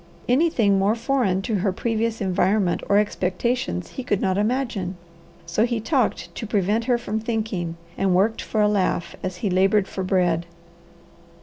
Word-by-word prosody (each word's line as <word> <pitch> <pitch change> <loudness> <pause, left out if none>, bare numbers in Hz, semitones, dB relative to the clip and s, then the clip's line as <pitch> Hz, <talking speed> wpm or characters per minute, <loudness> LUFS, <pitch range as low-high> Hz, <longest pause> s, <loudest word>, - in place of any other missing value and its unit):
Anything 245 -8 +3
more 200 +3 +2
foreign 230 -6 0
to 220 -2 0
her 195 +1 +1
previous 225 +3 -1
environment 190 0 +1
or 200 - +5
expectations 190 - -1
he 260 - -6
could 205 -5 0
not 190 -1 +1
imagine. 210 -4 -1 0.5
So 170 +6 +1
he 235 -1 0
talked 250 +1 0
to 225 - -6
prevent 210 +2 +1
her 245 -1 +2
from 220 -2 -3
thinking, 215 -7 -3 0.2
and 190 -2 +2
worked 210 +5 +2
for 215 - -1
a 210 - +5
laugh 185 -4 0
as 185 -1 -4
he - - +2
laboured 195 +2 +3
for 190 - -4
bread. 180 -3 +1
205 Hz, 165 wpm, -23 LUFS, 185-230 Hz, 0.5 s, or